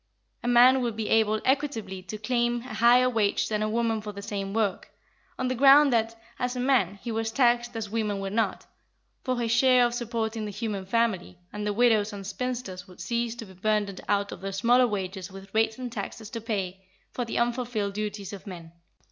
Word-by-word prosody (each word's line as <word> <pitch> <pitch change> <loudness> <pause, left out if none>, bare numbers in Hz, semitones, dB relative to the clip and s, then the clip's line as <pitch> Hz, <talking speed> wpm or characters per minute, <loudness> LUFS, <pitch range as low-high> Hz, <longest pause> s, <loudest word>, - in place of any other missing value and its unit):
A - - -4
man 250 +2 +6
would 235 -3 -2
be 220 -1 -3
able 215 -1 +3
equitably 245 -9 -1
to 215 +3 -7
claim 240 +2 0
a 250 -1 -9
higher 240 +3 +5
wage 220 -5 +1
than 215 -1 -1
a 215 - 0
woman 225 -1 0
for 210 0 -6
the 200 0 -9
same 200 -2 -4
work, 210 -3 -1 0.5
on 255 - -1
the 255 - 0
ground 275 +2 +6
that, 225 0 0 0.2
as 250 0 -1
a - - -3
man, 245 -8 +2
he 235 - -3
was 225 0 -2
taxed 240 0 +2
as 225 -1 -3
women 210 -1 -2
were 195 0 -4
not, 215 -3 -1 0.6
for 255 -2 -1
his 230 -1 -1
share 250 +1 +5
of 240 - -1
supporting 230 -2 -3
the - - -4
human 205 -2 -4
family, 205 -5 0 0.2
and 210 0 -3
the - - +1
widows 220 -2 +3
and 200 -1 -7
spinsters 230 -5 -4
would 180 - -16
cease 235 -1 -2
to 235 -1 -8
be 190 - -14
burdened 205 0 -1
out 200 0 +1
of - - -8
their 195 0 -4
smaller 240 +6 +4
wages 190 -2 -4
with 195 0 -12
rates 220 0 +2
and 250 -2 -5
taxes 215 -1 -6
to 230 - -5
pay 195 -4 -3 0.3
for 245 - -3
the 230 - -4
unfulfilled 235 -4 -1
duties 205 -1 -4
of 200 +1 -9
men. 170 -4 -9
220 Hz, 210 wpm, -27 LUFS, 200-240 Hz, 0.6 s, man